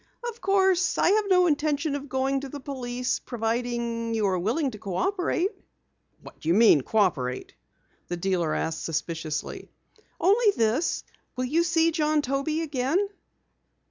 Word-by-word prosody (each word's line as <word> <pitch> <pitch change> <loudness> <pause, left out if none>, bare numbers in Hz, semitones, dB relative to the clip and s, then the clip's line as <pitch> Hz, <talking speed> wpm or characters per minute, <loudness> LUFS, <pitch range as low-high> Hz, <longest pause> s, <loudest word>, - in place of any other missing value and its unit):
"Of 470 -1 -7
course, 380 -1 +2
I - - +4
have 425 0 +3
no 365 -2 +5
intention 300 -1 0
of 285 0 -6
going 265 +1 0
to 275 0 -7
the 290 - -7
police, 250 -2 -3
providing 235 0 -2
you 220 -2 +1
are 185 -2 +1
willing 255 - 0
to 210 - -10
cooperate." 360 - -1 0.7
"What - - -13
d'you 165 +3 +1
mean, 215 -9 +6
cooperate?" 135 -10 0 0.5
the 175 - -3
dealer 175 -3 0
inquired 160 - -1
suspiciously. 160 -1 -4 0.5
"Only 410 +4 +4
this. 230 +9 +1 0.3
Will 255 - -1
you 320 +7 +2
see 330 -1 +2
John 305 -1 +1
Toby 275 +4 -1
again?" 305 +7 0
265 Hz, 140 wpm, -26 LUFS, 215-330 Hz, 0.7 s, mean